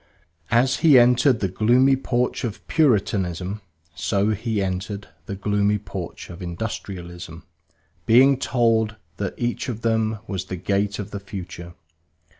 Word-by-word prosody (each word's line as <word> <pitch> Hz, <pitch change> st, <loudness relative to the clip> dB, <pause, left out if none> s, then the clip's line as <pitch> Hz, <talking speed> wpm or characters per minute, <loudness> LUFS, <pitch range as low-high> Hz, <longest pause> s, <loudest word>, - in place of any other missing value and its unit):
As 125 Hz, +3 st, +3 dB
he 150 Hz, -5 st, +6 dB
entered 125 Hz, 0 st, +4 dB
the 95 Hz, -, +2 dB
gloomy 120 Hz, +8 st, +4 dB
porch 125 Hz, -2 st, -1 dB
of 115 Hz, -4 st, -5 dB
Puritanism, 100 Hz, -, +1 dB, 0.3 s
so 100 Hz, +6 st, 0 dB
he 110 Hz, 0 st, -1 dB
entered 95 Hz, +1 st, -3 dB, 0.2 s
the 100 Hz, -, -4 dB
gloomy 105 Hz, +1 st, +1 dB
porch 95 Hz, -4 st, -7 dB
of 85 Hz, +2 st, -10 dB
Industrialism, 85 Hz, -3 st, -6 dB, 0.6 s
being 130 Hz, +4 st, +6 dB
told 115 Hz, -4 st, +1 dB, 0.2 s
that 100 Hz, -2 st, -3 dB
each 120 Hz, +2 st, -2 dB
of 115 Hz, -2 st, -4 dB
them 110 Hz, -1 st, +1 dB
was 95 Hz, -4 st, -4 dB
the 95 Hz, -, -5 dB
gate 100 Hz, +2 st, -1 dB
of 105 Hz, -, -6 dB
the 100 Hz, -, -4 dB
future. 90 Hz, -3 st, -8 dB
105 Hz, 135 wpm, -23 LUFS, 95-120 Hz, 0.6 s, he